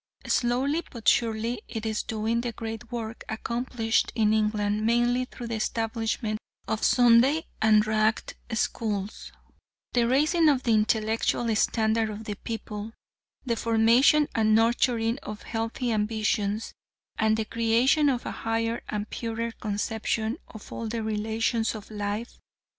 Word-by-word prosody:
Slowly 260 Hz, +6 st, +1 dB
but 230 Hz, -4 st, -9 dB
surely 230 Hz, 0 st, +2 dB
it 225 Hz, -1 st, -5 dB
is 220 Hz, -1 st, -1 dB
doing 225 Hz, +1 st, -1 dB
the 240 Hz, 0 st, -3 dB
great 225 Hz, +1 st, -7 dB
work 230 Hz, -1 st, -5 dB
accomplished 230 Hz, 0 st, -1 dB
in 215 Hz, -2 st, +3 dB
England 210 Hz, -1 st, +1 dB
mainly 240 Hz, +2 st, +2 dB
through 250 Hz, -1 st, -9 dB
the 230 Hz, -, -2 dB
establishment 225 Hz, 0 st, -2 dB, 0.3 s
of 220 Hz, -, -2 dB
Sunday 250 Hz, +6 st, +5 dB, 0.2 s
and 215 Hz, -1 st, +5 dB
"Ragged" 215 Hz, 0 st, +1 dB, 0.2 s
Schools 215 Hz, -3 st, -2 dB, 0.6 s
the 240 Hz, -1 st, +3 dB
raising 305 Hz, +6 st, +4 dB
of 270 Hz, -3 st, +2 dB
the 235 Hz, -, +1 dB
intellectual 220 Hz, +1 st, +1 dB
standard 220 Hz, 0 st, +1 dB
of 215 Hz, +1 st, -6 dB
the 210 Hz, -, -4 dB
people, 215 Hz, 0 st, -6 dB, 0.5 s
the 235 Hz, -2 st, 0 dB
formation 230 Hz, +7 st, +4 dB
and 215 Hz, -1 st, +3 dB
nurturing 230 Hz, +1 st, +2 dB
of 210 Hz, -1 st, -8 dB
healthy 230 Hz, +2 st, -2 dB
ambitions, 215 Hz, -1 st, 0 dB, 0.5 s
and 220 Hz, 0 st, +3 dB
the 220 Hz, -, -1 dB
creation 235 Hz, +7 st, +3 dB
of 250 Hz, -3 st, -1 dB
a -, -, -3 dB
higher 225 Hz, +1 st, -2 dB
and 210 Hz, 0 st, -3 dB
purer 230 Hz, 0 st, -3 dB
conception 220 Hz, -, -2 dB
of 220 Hz, -, -12 dB
all 230 Hz, -, -4 dB
the 225 Hz, 0 st, -3 dB
relations 220 Hz, +1 st, 0 dB
of 215 Hz, 0 st, -10 dB
life. 210 Hz, +2 st, -4 dB
225 Hz, 135 wpm, -27 LUFS, 215-235 Hz, 0.6 s, Sunday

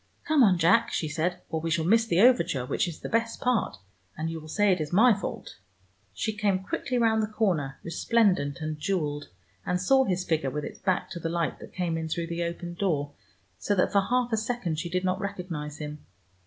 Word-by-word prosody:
"Come 310 Hz, -3 st, +4 dB
on, 195 Hz, -7 st, +5 dB
Jack," 225 Hz, +8 st, +4 dB
she 160 Hz, -, -1 dB
said, 170 Hz, +4 st, -2 dB
"or 160 Hz, -1 st, -1 dB
we 165 Hz, -, -2 dB
shall 165 Hz, -1 st, +1 dB
miss 225 Hz, +5 st, +4 dB
the 175 Hz, -3 st, +3 dB
overture 170 Hz, -, +4 dB
which 125 Hz, -, 0 dB
is 170 Hz, -, -7 dB
the -, -, -4 dB
best 230 Hz, 0 st, 0 dB
part, 245 Hz, -, 0 dB, 0.4 s
and 160 Hz, +1 st, -2 dB
you 165 Hz, -, -5 dB
will 155 Hz, -, -11 dB
say 205 Hz, +5 st, +2 dB
it 180 Hz, -3 st, +1 dB
is 150 Hz, -, -4 dB
my 225 Hz, +6 st, +6 dB
fault." 200 Hz, -, -6 dB, 0.5 s
She 210 Hz, -, -3 dB
came 200 Hz, -2 st, 0 dB
quickly 250 Hz, +5 st, -2 dB
round 225 Hz, -2 st, +3 dB
the 215 Hz, -, 0 dB
corner, 180 Hz, -11 st, -1 dB
resplendent 170 Hz, -5 st, +1 dB
and 155 Hz, -1 st, -4 dB
jeweled, 150 Hz, -5 st, -2 dB, 0.3 s
and 180 Hz, -, -1 dB
saw 265 Hz, +9 st, +4 dB
his 185 Hz, -2 st, 0 dB
figure 160 Hz, -5 st, 0 dB
with 150 Hz, +2 st, -4 dB
its -, -, -8 dB
back 190 Hz, -1 st, -1 dB
to 175 Hz, -, -5 dB
the 165 Hz, -, -3 dB
light 170 Hz, -1 st, -1 dB
that -, -, -12 dB
came 170 Hz, -3 st, -1 dB
in 160 Hz, 0 st, -4 dB
through 170 Hz, +1 st, -2 dB
the 170 Hz, 0 st, -3 dB
open 170 Hz, +1 st, -5 dB
door, 155 Hz, -6 st, -1 dB, 0.5 s
so 205 Hz, -, 0 dB
that 180 Hz, -, +2 dB
for 200 Hz, -, +4 dB
half 245 Hz, +3 st, 0 dB
a -, -, +3 dB
second 215 Hz, -8 st, -2 dB
she 170 Hz, +1 st, -4 dB
did 180 Hz, +1 st, -1 dB
not 185 Hz, +1 st, 0 dB
recognize 175 Hz, -7 st, -5 dB
him. 150 Hz, -1 st, -7 dB
180 Hz, 220 wpm, -27 LUFS, 160-210 Hz, 0.5 s, my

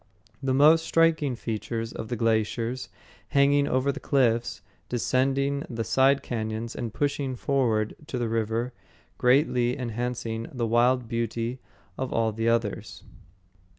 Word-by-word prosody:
The 130 Hz, -1 st, 0 dB
most 155 Hz, +4 st, +6 dB
striking 165 Hz, -5 st, +2 dB
features 115 Hz, 0 st, -4 dB
are -, -, -5 dB
the 120 Hz, -, -3 dB
glaciers, 115 Hz, 0 st, 0 dB, 0.4 s
hanging 140 Hz, 0 st, +3 dB
over 130 Hz, +2 st, +1 dB
the -, -, -7 dB
cliffs, 120 Hz, -4 st, +1 dB, 0.3 s
descending 135 Hz, +3 st, 0 dB
the 115 Hz, -1 st, -3 dB
side 135 Hz, +5 st, +3 dB
cañons 110 Hz, 0 st, -3 dB
and 120 Hz, -3 st, -4 dB
pushing 140 Hz, 0 st, -1 dB
forward 115 Hz, -5 st, 0 dB
to 130 Hz, -, -4 dB
the 120 Hz, -1 st, -1 dB
river, 115 Hz, +2 st, -1 dB, 0.5 s
greatly 125 Hz, -1 st, +3 dB
enhancing 120 Hz, -2 st, -3 dB
the 125 Hz, -4 st, -2 dB
wild 120 Hz, +2 st, +2 dB
beauty 115 Hz, +2 st, -2 dB, 0.4 s
of 130 Hz, -, -2 dB
all 115 Hz, -1 st, +1 dB
the 115 Hz, +2 st, 0 dB
others. 115 Hz, -2 st, -2 dB
120 Hz, 130 wpm, -26 LUFS, 115-135 Hz, 0.5 s, most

